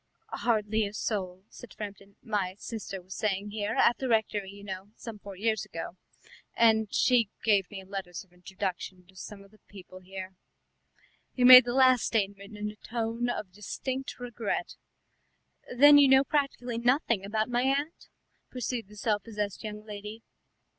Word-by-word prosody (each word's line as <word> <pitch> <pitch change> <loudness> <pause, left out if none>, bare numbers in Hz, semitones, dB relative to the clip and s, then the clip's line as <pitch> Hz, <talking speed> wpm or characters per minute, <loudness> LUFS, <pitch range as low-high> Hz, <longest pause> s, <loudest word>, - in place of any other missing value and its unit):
"Hardly 220 -2 0
a 200 - -9
soul," 190 -4 -3
said 245 - -13
Framton. 200 -1 -8
"My 195 -4 -2
sister 205 -4 -7
was 190 +2 -9
staying 205 -1 -2
here, 205 -1 -2
at 240 - +4
the 265 - -2
rectory, 215 -3 0
you 200 +1 -12
know, 190 0 -7
some 225 -3 -9
four 200 -1 -10
years 220 +1 0
ago, 165 +1 -7 0.6
and 220 -2 +3
she 240 -5 +3
gave 200 -4 +3
me 195 -2 -8
letters 190 -2 -6
of 180 -2 -28
introduction 185 0 -5
to 190 - -21
some 200 +1 -9
of 200 - -20
the 215 - -22
people 185 -2 -12
here." 190 0 -8 1.0
He 250 - +1
made 255 0 +11
the 240 +1 -2
last 255 -2 +5
statement 200 -1 -2
in 210 0 -3
a 210 - -17
tone 230 +2 -3
of 210 -5 -4
distinct 255 +8 -5
regret. 240 -3 -3 1.0
"Then 290 +2 +9
you 285 - +7
know 265 0 +6
practically 270 -5 -1
nothing 240 - +1
about 215 +2 -1
my 245 0 0
aunt?" 280 +5 -1 0.4
pursued 245 -3 -4
the 210 - -15
self 205 0 0
possessed 210 -2 -5
young 210 0 -7
lady. 210 +1 -8
210 Hz, 165 wpm, -29 LUFS, 195-235 Hz, 1.0 s, made